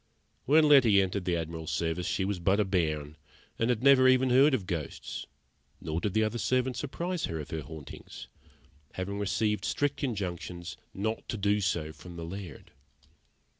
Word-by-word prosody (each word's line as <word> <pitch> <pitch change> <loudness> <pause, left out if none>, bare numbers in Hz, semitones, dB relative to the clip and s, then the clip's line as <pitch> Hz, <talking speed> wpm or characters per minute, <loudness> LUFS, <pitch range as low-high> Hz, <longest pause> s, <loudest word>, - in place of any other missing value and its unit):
When 155 +3 +5
Letty 125 -9 +7
entered 95 0 0
the 90 -2 +1
Admiral's 80 -1 -5
service 85 +1 -1
she 95 - 0
was 100 -2 -2
but 95 +4 +2
a 105 - +3
bairn, 80 -5 -1 0.4
and 115 - +1
had 120 -1 0
never 135 -2 +7
even 130 0 +4
heard 135 +3 +6
of 100 -7 -4
ghosts; 85 -5 -5 0.5
nor 80 +1 -3
did 105 -1 -2
the 110 - +4
other 110 +2 -1
servants 130 +2 0
apprise 170 +5 -2
her 80 - -4
of 75 - -7
the 80 - -3
hauntings, 75 -4 -10 0.7
having 100 +2 -4
received 105 +2 0
strict 145 0 -1
injunctions 90 -7 -4 0.2
not 110 +3 -3
to 110 - -2
do 105 +1 +1
so 85 -5 -1
from 85 +3 -11
the 85 -1 -6
Laird. 90 -4 -8
100 Hz, 170 wpm, -29 LUFS, 85-120 Hz, 0.7 s, Letty